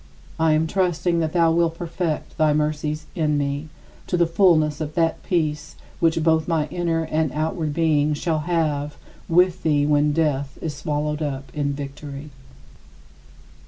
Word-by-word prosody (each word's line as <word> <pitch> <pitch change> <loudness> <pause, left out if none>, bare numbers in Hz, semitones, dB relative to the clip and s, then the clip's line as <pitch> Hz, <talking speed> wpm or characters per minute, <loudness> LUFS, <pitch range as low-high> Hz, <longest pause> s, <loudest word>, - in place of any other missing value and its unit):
I 160 -1 +4
am 155 +1 +2
trusting 175 -1 0
that 160 -1 -1
thou 165 -2 +4
wilt 165 0 +1
perfect 170 -2 -3
thy 155 -1 +4
mercies 150 0 -1
in 155 -5 +1
me, 145 +2 -2 0.4
to 180 - 0
the 170 - +4
fullness 165 -4 +3
of 150 0 -4
that 165 -1 +1
peace 155 -4 -1 0.2
which 165 -1 +2
both 160 -1 +2
my 160 -3 +1
inner 165 -2 -1
and 155 -2 0
outward 155 0 -1
being 155 -2 +2
shall 160 +1 -1
have 150 -3 -1 0.3
with 180 +2 +3
thee 145 -2 +2
when 150 0 +3
death 145 -3 0
is 155 -3 -4
swallowed 150 0 -2
up 135 -3 -4
in 145 -1 -1
victory. 140 +1 -7
155 Hz, 155 wpm, -23 LUFS, 150-165 Hz, 0.4 s, I